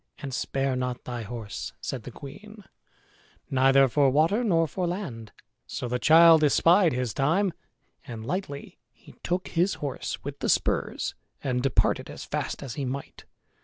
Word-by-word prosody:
And 140 -3 -7
spare 135 +1 -1
not 125 -1 -3
thy 120 -1 -5
horse," 115 -2 -6
said 125 -5 -5
the - - -6
queen, 205 - -11 0.9
"neither 135 +1 +5
for 140 +2 +3
water 160 - +2
nor 165 -7 +2
for 180 +4 -2
land." 140 - -5 0.4
So 125 - -4
the 125 +1 -1
child 160 +2 +7
espied 170 +4 +5
his 125 -3 -2
time, 165 +7 +1 0.5
and 115 -2 -7
lightly 145 -2 -5
he - - -17
took 180 +1 -2
his 180 +3 +1
horse 140 -3 -5
with - - -6
the - - -1
spurs - - 0 0.3
and 125 -2 0
departed 135 -2 +1
as - - -8
fast - - -3
as 130 -4 -6
he 145 - -4
might. 135 +2 -6
140 Hz, 160 wpm, -27 LUFS, 125-170 Hz, 0.9 s, child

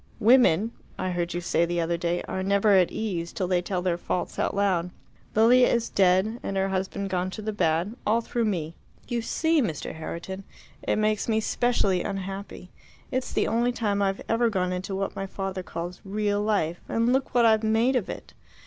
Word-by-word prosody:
Women 225 -3 +5 0.3
I 185 0 -2
heard 175 -1 -2
you 175 - -2
say 170 -1 +1
the 175 0 0
other 170 +1 0
day 170 +1 -1
are 190 - -4
never 200 +2 +3
at 185 -3 +5
ease 175 -6 -3
till 185 - -2
they 180 -1 +2
tell 180 0 -3
their 175 -2 0
faults 180 - -3
out - - 0
loud. 185 -4 +1 0.5
Lilia 245 +3 +6
is 235 -1 +1
dead 195 +4 +2
and 195 - -3
her 195 0 +1
husband 190 +1 -2
gone 180 0 0
to 215 - -7
the 215 0 -2
bad 175 +2 0
all 220 +2 +2
through 235 0 -2
me. 165 -6 -2 0.3
You 240 -1 -1
see, 320 +6 +1
Mr. 165 - -3
Herriton, 170 +4 -6 0.4
it - - 0
makes 215 +1 0
me 220 -1 +3
specially 215 -5 +1
unhappy; 195 -1 -6 0.4
it's 255 0 -2
the - - +1
only 235 +2 +1
time 210 -4 -1
I've 195 -1 0
ever 230 +1 +2
gone 185 -3 -1
into 185 +2 -4
what 195 0 -3
my 195 - -4
father 195 -1 -4
calls 175 0 -6
'real 205 +1 -1
life' 200 -6 0
and 230 +2 +2
look 265 -1 -1
what 240 -1 +5
I've 220 -1 +5
made 225 +4 +2
of 240 -7 0
it! - - -8
195 Hz, 200 wpm, -26 LUFS, 180-220 Hz, 0.5 s, Lilia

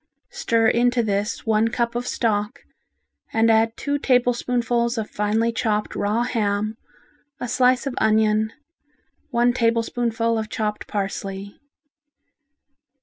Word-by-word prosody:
Stir 230 - +1
into 240 +1 +2
this 205 0 -2
one 220 0 +2
cup 235 0 -1
of 240 +1 -3
stock, 220 +3 -1 0.7
and 225 0 +3
add 225 +1 +2
two 285 0 -1
tablespoonfuls 245 -2 +1
of 220 -1 -4
finely 215 +3 0
chopped 215 -2 -1
raw 215 +4 0
ham, 215 -3 -1 0.6
a 245 - -4
slice 250 +2 +2
of 275 - -2
onion, 215 0 +2 0.8
one 240 -2 +2
tablespoonful 230 -1 0
of 215 -1 -4
chopped 210 -1 -3
parsley. 195 -1 -4
230 Hz, 115 wpm, -22 LUFS, 215-240 Hz, 0.8 s, and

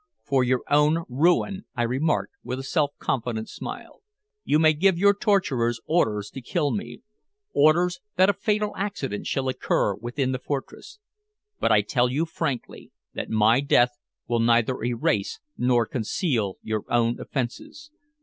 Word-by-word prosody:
"For 135 -2 +2
your 125 0 +1
own 150 +3 +3
ruin," 175 +8 +1
I 120 - 0
remarked 135 - 0
with 125 - -4
a 135 - -6
self 145 +1 +1
confident 115 -3 -2
smile. - - -8 0.4
"You 150 - +2
may 155 0 +5
give 180 +3 +2
your 200 +3 +5
torturers 135 - +1
orders 110 -11 0
to 135 - -8
kill 145 +3 -1
me 120 +2 -5 0.5
orders 175 +5 +3 0.2
that 185 0 +5
a 205 - +3
fatal 210 +1 -1
accident 185 - -4
shall 135 -1 -1
occur 130 -5 0
within 120 +6 -3
the 130 - -2
fortress 145 - -6 0.6
but - - +2
I 105 - +5
tell 120 +4 +1
you 145 +6 0
frankly 140 -6 -4 0.2
that - - -5
my 110 +3 +4
death 120 -3 +3 0.3
will 120 0 0
neither 120 +1 +2
erase 115 -4 -1 0.2
nor 120 -2 +2
conceal 110 - -1
your 110 -1 -2
own 120 0 +1
offenses. 145 - -5
130 Hz, 150 wpm, -25 LUFS, 120-165 Hz, 0.6 s, may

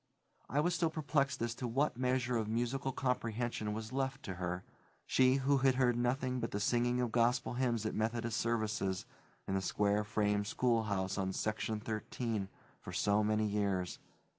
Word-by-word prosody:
I 145 +4 +2
was 175 +3 +1
still 165 0 +2
perplexed 145 -5 0
as 115 0 -1
to 125 - -4
what 135 +5 +1
measure 125 0 +1
of 110 -2 0
musical 120 +4 -1
comprehension 120 -4 -1
was 110 +1 -5
left 135 0 -1
to 95 - -4
her, 90 +1 -2 0.4
she 130 0 +4
who 135 +1 +3
had 130 -1 +4
heard 125 -2 +3
nothing 125 +1 0
but 115 -1 -2
the 105 - -2
singing 120 +3 +2
of 120 -2 0
gospel 120 +2 +2
hymns 120 -3 0
at 110 - -1
Methodist 115 0 -1
services 110 -5 -1 0.4
in - - -1
the 95 - +1
square 105 +2 +1
frame 105 -1 +1
schoolhouse 105 -4 0
on 95 0 -1
Section 110 +1 -1
Thirteen 110 -1 -3 0.3
for - - -8
so 105 +1 +2
many 110 +1 +2
years. 100 -3 -1
115 Hz, 170 wpm, -34 LUFS, 105-125 Hz, 0.4 s, she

